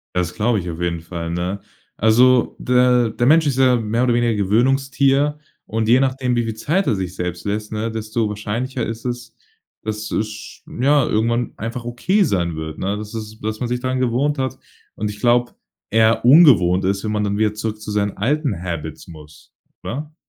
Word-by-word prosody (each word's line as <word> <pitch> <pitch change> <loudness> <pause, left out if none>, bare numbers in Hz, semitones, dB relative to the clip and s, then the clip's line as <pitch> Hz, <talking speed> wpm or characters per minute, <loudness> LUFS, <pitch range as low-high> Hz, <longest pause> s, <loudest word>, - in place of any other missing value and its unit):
Das 90 -1 0
glaube 110 0 +1
ich 90 -1 -5
auf 85 +1 -7
jeden 85 -1 -1
Fall, 85 0 -6
ne? 90 +3 -2 0.4
Also 125 +3 +4
der 125 -2 +3
der 120 +2 -1
Mensch 160 +3 +5
ist 135 -2 -1
ja 130 -1 +5
mehr 115 +1 0
oder 125 -2 +2
weniger 120 0 +2
'n - - -2
Gewöhnungstier 135 +7 +2 0.3
und 110 0 -2
je 120 +2 +6
nachdem, 130 -2 0
wie 120 - +1
viel 110 -1 -3
Zeit 165 - 0
er 115 - +2
sich 95 -2 -4
selbst 90 -1 -4
lässt, 105 +1 -3
ne, 110 +1 -2
desto 110 0 -2
wahrscheinlicher 115 +5 -3
ist 115 0 -6
es, 120 -2 -5 0.5
dass 110 0 -5
es 110 - 0
sch 110 +1 -10 0.2
ja, 140 +1 +4
irgendwann 115 +2 0
einfach 115 +2 -5
okay 150 - +1
sein 85 - 0
wird, 80 0 -6
ne, 100 +2 -2
dass 105 0 -7
es 110 -1 -7
dass 110 0 -3
man 125 - -3
sich 125 0 -2
dran 130 0 -1
gewohnt 130 +4 0
hat. 130 -2 -2 0.4
Und 105 0 -3
ich 105 - -9
glaube, 120 +2 +2 0.4
eher 110 +1 +3
ungewohnt 120 - +6
ist, 95 +1 0
wenn 110 - -3
man 105 -1 0
dann 100 0 -1
wieder 105 -1 +1
zurück 110 0 -4
zu 105 - -6
seinen 105 -1 -1
alten 130 - -1
Habits 85 -3 -6
muss, 75 -4 -14 0.3
oder? 150 +5 -6
110 Hz, 200 wpm, -20 LUFS, 105-125 Hz, 0.5 s, je